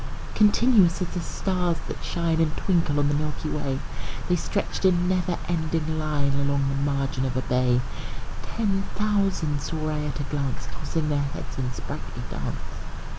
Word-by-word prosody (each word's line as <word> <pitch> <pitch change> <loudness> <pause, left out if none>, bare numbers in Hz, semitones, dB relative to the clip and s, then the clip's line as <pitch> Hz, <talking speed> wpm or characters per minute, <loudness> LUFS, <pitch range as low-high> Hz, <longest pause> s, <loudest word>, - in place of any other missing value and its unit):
Continuous 210 -4 +5
as 180 - -1
the 180 - -3
stars 180 -1 0
that - - -6
shine 165 -2 +1
And 155 -1 +1
twinkle 170 -6 +2
on 145 0 +3
the 145 - +2
milky 150 +1 -1
way, 135 -3 -1 0.5
The 180 - +5
stretched 200 +5 -2
in 180 -2 +4
never 180 -1 +1
ending 160 -2 0
line 145 -3 +1
Along 140 -1 +2
the 140 +1 +1
margin 135 -1 0
of 130 -1 -1
a 130 - 0
bay: 125 -1 +3 0.6
Ten 200 -4 0
thousand 195 -8 +1
saw 155 +1 -2
I 150 - -1
at 145 0 -3
a - - 0
glance, 140 -2 -2
Tossing 160 -2 -2
their 145 -1 +2
heads 140 -1 -5
in 125 -1 -1
sprightly - - -6
dance. - - -3
155 Hz, 170 wpm, -26 LUFS, 140-180 Hz, 0.6 s, Continuous